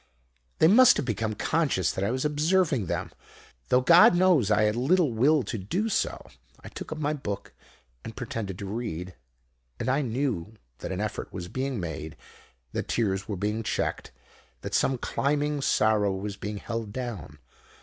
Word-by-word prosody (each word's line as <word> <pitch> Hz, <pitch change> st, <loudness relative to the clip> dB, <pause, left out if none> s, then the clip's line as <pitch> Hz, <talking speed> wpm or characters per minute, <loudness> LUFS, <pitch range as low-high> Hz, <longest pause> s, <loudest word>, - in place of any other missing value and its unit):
"They 160 Hz, -, +5 dB
must 245 Hz, +7 st, +7 dB
have 145 Hz, -, -1 dB
become 110 Hz, -2 st, -2 dB
conscious 130 Hz, -, +1 dB
that 95 Hz, -, -3 dB
I 100 Hz, -, +1 dB
was 130 Hz, +4 st, -1 dB
observing 150 Hz, -, +1 dB
them, -, -, -3 dB, 0.6 s
though 125 Hz, -, +4 dB
God 170 Hz, +6 st, +7 dB
knows 175 Hz, -, +4 dB
I 105 Hz, 0 st, +3 dB
had 105 Hz, 0 st, +2 dB
little 150 Hz, +4 st, +2 dB
will 135 Hz, +5 st, +3 dB
to 115 Hz, -, -4 dB
do 185 Hz, -, -2 dB
so. -, -, -1 dB, 0.4 s
I -, -, -9 dB
took -, -, -8 dB
up 155 Hz, -, -4 dB
my 150 Hz, 0 st, -1 dB
book 105 Hz, -9 st, -5 dB, 0.5 s
and -, -, -8 dB
pretended 100 Hz, -5 st, -5 dB
to 100 Hz, -, -6 dB
read; 95 Hz, -4 st, -5 dB, 0.7 s
and -, -, -2 dB
I 135 Hz, +3 st, +2 dB
knew 115 Hz, -, -2 dB, 0.2 s
that -, -, -5 dB
an -, -, -3 dB
effort -, -, -4 dB
was 90 Hz, -1 st, -6 dB
being 130 Hz, 0 st, -3 dB
made, 80 Hz, -2 st, -6 dB, 0.5 s
that -, -, -3 dB
tears 95 Hz, -4 st, -1 dB
were 100 Hz, -, -3 dB
being 105 Hz, +4 st, -1 dB
checked, 110 Hz, -, -2 dB, 0.5 s
that -, -, -6 dB
some 130 Hz, -, +2 dB
climbing 145 Hz, +3 st, -1 dB
sorrow 105 Hz, -5 st, +2 dB
was 100 Hz, +1 st, -5 dB
being 105 Hz, +1 st, -5 dB
held 115 Hz, 0 st, -5 dB
down. 105 Hz, -, -6 dB
115 Hz, 170 wpm, -27 LUFS, 100-145 Hz, 0.7 s, must